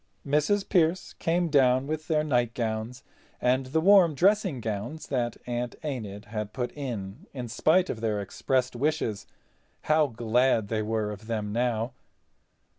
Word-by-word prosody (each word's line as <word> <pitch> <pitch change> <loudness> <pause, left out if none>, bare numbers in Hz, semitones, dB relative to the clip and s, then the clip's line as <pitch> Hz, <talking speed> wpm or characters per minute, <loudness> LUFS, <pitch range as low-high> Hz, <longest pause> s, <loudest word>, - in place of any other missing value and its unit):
Mrs. 150 +8 +1
Pearce 175 -1 +1
came 170 +1 0
down 130 -3 +4
with 155 +2 -4
their 155 -2 +2
nightgowns 120 -3 -1 0.4
and 130 +1 +1
the 155 +5 +1
warm 180 -3 +6
dressing 190 - +2
gowns 115 +7 -4
that 120 -4 -1
Aunt 120 0 -3
Enid 105 -8 -5
had 105 -1 -5
put 125 -2 -3
in 125 - -6
in 125 -2 -4
spite 160 +11 +3
of 110 - -4
their 110 -2 0
expressed 125 +5 -1
wishes. 135 -6 -1 0.5
How 155 -1 +3
glad 120 -2 +1
they 110 -1 0
were 110 -1 -1
of 105 +1 -9
them 105 -3 -2
now! 120 0 0
125 Hz, 145 wpm, -27 LUFS, 110-155 Hz, 0.5 s, warm